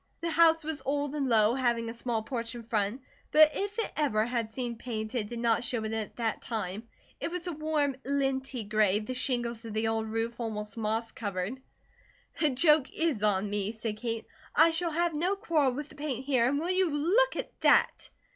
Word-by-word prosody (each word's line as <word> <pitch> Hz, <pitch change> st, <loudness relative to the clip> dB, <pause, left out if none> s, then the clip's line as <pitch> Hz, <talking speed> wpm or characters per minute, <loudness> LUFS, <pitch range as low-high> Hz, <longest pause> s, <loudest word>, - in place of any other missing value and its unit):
The 335 Hz, 0 st, -1 dB
house 325 Hz, -1 st, +5 dB
was 310 Hz, -1 st, -3 dB
old 285 Hz, +1 st, -1 dB
and 280 Hz, -3 st, -1 dB
low, 220 Hz, -1 st, +4 dB
having 240 Hz, -3 st, 0 dB
a 230 Hz, -, -4 dB
small 235 Hz, -2 st, -2 dB
porch 230 Hz, -1 st, -4 dB
in 235 Hz, -, -7 dB
front, 220 Hz, +2 st, -1 dB, 0.3 s
but 310 Hz, 0 st, +7 dB
if 405 Hz, +2 st, -3 dB
it 455 Hz, -, -1 dB
ever 220 Hz, -8 st, +1 dB
had 235 Hz, -2 st, -2 dB
seen 240 Hz, 0 st, -3 dB
paint, 220 Hz, -1 st, -5 dB
it 215 Hz, -5 st, -2 dB
did 240 Hz, -, -5 dB
not 230 Hz, -1 st, +2 dB
show 235 Hz, -2 st, 0 dB
it 220 Hz, 0 st, -3 dB
at 220 Hz, -2 st, -4 dB
that 230 Hz, -2 st, -2 dB
time. 215 Hz, -1 st, -4 dB, 0.3 s
It -, -, -2 dB
was 355 Hz, 0 st, -4 dB
a 350 Hz, -, -2 dB
warm 305 Hz, -3 st, 0 dB
linty 270 Hz, -3 st, -1 dB
gray, 210 Hz, -1 st, +2 dB
the 215 Hz, +4 st, -4 dB
shingles 240 Hz, -3 st, -2 dB
of 225 Hz, -2 st, -7 dB
the 220 Hz, +1 st, +1 dB
old 225 Hz, 0 st, -1 dB
roof 225 Hz, +2 st, -3 dB
almost 210 Hz, -2 st, -4 dB
moss 225 Hz, +1 st, -1 dB
covered. 205 Hz, +3 st, -4 dB, 0.8 s
"The 305 Hz, -, +3 dB
joke 300 Hz, +1 st, +4 dB
IS 320 Hz, -10 st, -1 dB
on 205 Hz, -1 st, +2 dB
me," 205 Hz, +1 st, -2 dB
said 220 Hz, -1 st, -4 dB
Kate. 230 Hz, 0 st, -3 dB, 0.3 s
"I 325 Hz, +2 st, +6 dB
shall 335 Hz, +1 st, 0 dB
have 340 Hz, +1 st, 0 dB
no 355 Hz, +6 st, +1 dB
quarrel 320 Hz, -, +1 dB
with 290 Hz, +3 st, -5 dB
the -, -, -14 dB
paint 275 Hz, -3 st, -4 dB
here, 255 Hz, -4 st, +3 dB
and 285 Hz, -, 0 dB
will 340 Hz, +4 st, -1 dB
you 370 Hz, -1 st, +2 dB
look 370 Hz, +13 st, +2 dB
at -, -, -4 dB
that?" -, -, +3 dB
245 Hz, 210 wpm, -29 LUFS, 220-300 Hz, 0.8 s, but